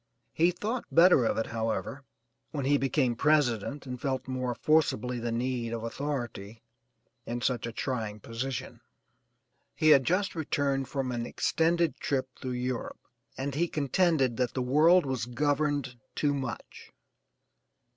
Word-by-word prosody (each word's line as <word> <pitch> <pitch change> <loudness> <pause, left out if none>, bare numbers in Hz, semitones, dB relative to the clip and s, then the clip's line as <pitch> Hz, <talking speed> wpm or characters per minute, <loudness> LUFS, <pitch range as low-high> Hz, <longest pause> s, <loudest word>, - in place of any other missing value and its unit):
He 170 +2 +4
thought 215 +7 -3
better 170 -7 +6
of - - 0
it, 115 - 0
however, 115 +4 -3 0.5
when 140 -4 -3
he 145 +1 +3
became 130 -2 +1
President 140 -2 +1
and 125 -1 -6
felt 130 -2 -2
more 130 -2 -2
forcibly 125 -6 +1
the 120 0 -2
need 120 -1 -2
of 115 -1 -4
authority 115 -5 -5 0.6
in 120 +1 -3
such 120 -1 0
a - - -4
trying 110 -4 -3
position. 120 +4 -5 0.9
He 155 - +3
had 135 -3 +7
just 185 +8 +1
returned 140 -4 -1
from 135 -2 -2
an 120 -1 -3
extended 170 +1 +1
trip 130 -3 -1
through 130 -1 -5
Europe, 125 0 -3 0.4
and 135 +1 -3
he 170 +5 +1
contended 145 -4 +1
that 125 -1 -1
the 130 - 0
world 155 +7 +5
was 130 -4 -2
governed 145 0 0 0.2
too 145 -1 +1
much. 130 -5 -6
130 Hz, 145 wpm, -29 LUFS, 120-150 Hz, 0.9 s, had